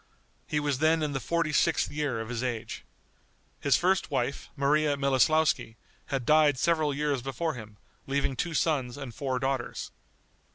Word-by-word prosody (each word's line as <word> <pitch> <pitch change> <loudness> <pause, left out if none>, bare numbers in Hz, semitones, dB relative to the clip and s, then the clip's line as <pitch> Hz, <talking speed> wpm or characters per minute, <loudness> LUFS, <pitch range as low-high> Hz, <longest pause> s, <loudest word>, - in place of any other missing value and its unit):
He 150 - 0
was 145 -3 -1
then 160 +1 +3
in 150 - -1
the 135 - -1
forty 165 +4 -1
sixth - - +2
year 145 -5 -2
of 110 0 -5
his 120 -1 -3
age. 120 -3 -4 0.8
His 140 - +3
first 185 0 +1
wife, 135 -1 -2
Maria 145 +1 +2
Miloslouski, 140 -2 +2 0.3
had 135 -4 -2
died 150 -2 +5
several 160 0 +2
years 145 -2 -1
before 155 +5 -2
him, 105 -3 -10 0.3
leaving 140 -1 0
two 170 +4 -2
sons 135 -7 0
and 135 -5 -7
four 130 0 -2
daughters. 135 -1 -3
140 Hz, 160 wpm, -28 LUFS, 130-155 Hz, 0.8 s, died